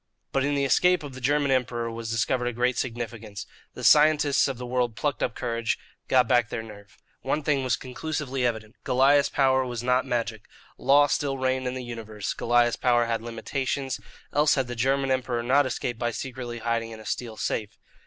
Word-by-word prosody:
But 135 - +1
in 145 +1 +1
the 140 -1 +1
escape 180 +5 +3
of 145 -2 -7
the 130 - -9
German 145 +2 +2
Emperor 120 -3 0
was 115 -1 -6
discovered 120 +2 0
a 120 - -2
great 125 +2 +1
significance. 115 -4 -5 0.3
The - - -8
scientists 150 -2 +5
of 135 -3 -4
the 125 - -6
world 120 -2 -1
plucked 145 +3 -2
up 120 - -1
courage, 115 -1 -1 0.3
got - - +4
back 120 -3 +3
their 115 - -4
nerve. 100 -3 -13 0.2
One 155 - -1
thing 140 -3 +1
was 125 -2 +1
conclusively 135 0 -4
evident 110 -2 -2
Goliah's 140 +3 +4
power 130 -1 +3
was 120 -2 -4
not 125 +1 +2
magic. 115 -3 -2 0.3
Law 140 +2 +5
still 140 -1 -1
reigned 130 0 0
in 125 - -3
the 130 - -5
universe. 110 -4 -5
Goliah's 120 0 +2
power 120 -1 +3
had 115 -1 -1
limitations, 130 +2 -3 0.3
else 150 0 +4
had 135 -2 +1
the 120 0 -6
German 135 +3 +1
Emperor 125 -2 0
not 135 +3 +3
escaped 120 -2 -3
by 120 - 0
secretly 120 -1 -5
hiding 115 0 -1
in 110 -1 -9
a 110 - -12
steel 115 -3 -4
safe. 110 0 -3
125 Hz, 195 wpm, -26 LUFS, 115-135 Hz, 0.3 s, scientists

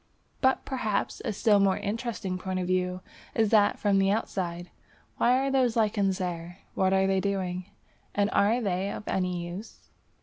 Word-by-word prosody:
But 260 0 +2
perhaps 220 -7 -2
a - - -1
still 205 0 +3
more 195 -1 +3
interesting 205 -3 -3
point 185 0 -3
of 185 - -1
view 180 0 0 0.3
is 220 -2 +2
that 210 -2 +4
from 200 -2 +2
the 195 0 +3
outside. 180 -4 -2 0.5
Why 250 +2 +4
are 270 +1 0
those 255 -4 +2
lichens 205 -4 +1
there? 175 -1 -4 0.2
What 190 0 +2
are 190 0 +3
they 195 0 +2
doing, 185 -2 -2 0.5
and 205 0 +3
are 215 +4 +3
they 195 -2 -1
of - - -7
any 180 -2 -1
use? 185 +6 -10
195 Hz, 170 wpm, -28 LUFS, 185-215 Hz, 0.5 s, that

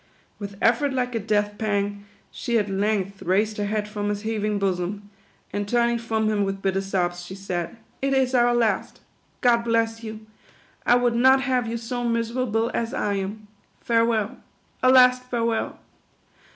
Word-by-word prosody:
With 200 -1 -7
effort 255 +5 +3
like 250 -1 -1
a 230 - 0
death 205 -1 0
pang, 205 -1 -1 0.3
she 235 -1 -1
at 205 -2 0
length 200 -1 -1
raised 210 +4 +1
her 205 -1 -1
head 210 0 -1
from 205 -1 -3
his 205 0 -3
heaving 215 -1 -1
bosom, 195 +1 -2 0.4
and 205 0 -2
turning 235 +1 +2
from 220 -2 -1
him 210 -1 +1
with 195 0 -2
bitter 195 0 +1
sobs, 175 -2 -1
she 185 +2 -8
said, 185 0 -4 0.2
"It 275 0 0
is 265 -1 +2
our 240 -1 +4
last. 230 -3 0 0.4
God 240 -1 +5
bless 230 -1 0
you. 215 -1 -7 0.6
I 245 - +6
would 245 -1 +2
not 260 +3 +5
have 255 -3 0
you 230 +1 -2
so 245 +1 -4
miserable 230 0 0
as 230 0 -2
I 205 - 0
am. 200 +2 -4 0.4
Farewell. 230 0 +1 0.4
A 255 - +5
last 250 -1 +6
farewell. 230 -2 -1
220 Hz, 165 wpm, -24 LUFS, 205-235 Hz, 0.6 s, I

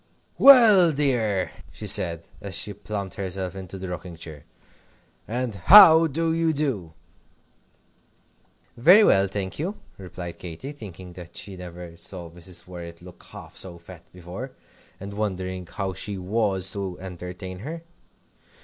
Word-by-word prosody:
"Well, 230 -10 +8
my 155 - -3
dear," 110 - 0 0.2
she - - -9
said, 85 -1 +2 0.2
as 100 -3 -5
she 105 - -1
plumped 100 -1 -6
herself 95 -1 -4
into 95 0 -8
the 95 0 -6
rocking 90 -1 -7
chair, 80 -3 -10 0.8
"and 120 +1 -3
how 165 - +8
do 165 +2 -1
you 165 -1 +1
do?" 125 - -2 1.8
"Very 180 - +7
well, 100 - +4
thank 95 +1 -5
you," 185 +7 -3 0.2
replied 90 -2 -8
Katy, 90 - -7
thinking 95 - -10
that 85 -1 -11
she 100 - -7
never 90 -1 -10
saw 85 -2 -7
Mrs. 85 0 -8
Worrett 85 -1 -10
look 90 -1 -14
half - - -12
so 90 -2 -7
fat 85 0 -13
before, 90 +9 -9 0.5
and 100 +1 -8
wondering 95 -3 -4
how 95 +1 -4
she 100 +1 -5
was 95 -1 0
to 95 -3 -5
entertain 90 0 -8
her. 160 - -7
95 Hz, 140 wpm, -24 LUFS, 90-120 Hz, 1.8 s, Well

